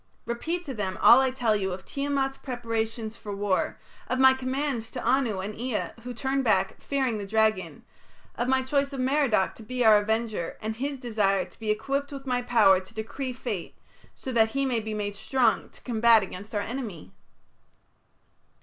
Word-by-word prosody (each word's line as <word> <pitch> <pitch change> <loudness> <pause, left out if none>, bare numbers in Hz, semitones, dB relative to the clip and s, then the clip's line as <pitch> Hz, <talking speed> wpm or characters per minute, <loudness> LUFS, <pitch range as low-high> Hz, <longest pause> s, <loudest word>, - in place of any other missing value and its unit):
Repeat 325 +10 -3
to 280 -6 -5
them 195 -5 -3
all 240 - +8
I 265 - +2
tell 245 -4 +1
you 190 -2 -1
of 185 - -8
Tiamat's 275 -1 -1
preparations 230 -3 -3
for 205 -1 -6
war, 200 -2 0 0.3
of 255 - -1
my 265 0 +7
commands 260 -2 -2
to - - -6
Anu 240 -5 +2
and 205 +3 -5
Ea, 240 0 -3
who 250 - -5
turned 265 +3 -1
back, 225 - +1
fearing 265 -6 -1
the 200 - -5
dragon, 215 -2 +1 0.5
of 240 - -2
my 260 0 +2
choice 280 +1 0
of 270 - -4
Merodach 255 -7 +2
to - - -13
be 250 +2 -1
our 215 -1 +8
avenger, 220 -4 -2
and 220 0 -4
his 280 +2 -2
desire 210 -6 +1
to - - -20
be 220 -1 -4
equipped 275 +6 -1
with 275 -1 -7
my 250 -2 0
power 220 -6 +5
to 190 +3 -14
decree 255 +4 -4
fate, 230 -7 -5 0.4
so 260 - -6
that 225 -2 +4
he 275 - +2
may 250 -3 +1
be 220 0 -4
made 205 -1 -3
strong 255 +4 +1
to - - -16
combat 230 -2 +5
against 200 +3 -8
our 205 - +1
enemy." 210 - -6
235 Hz, 185 wpm, -27 LUFS, 215-265 Hz, 0.5 s, all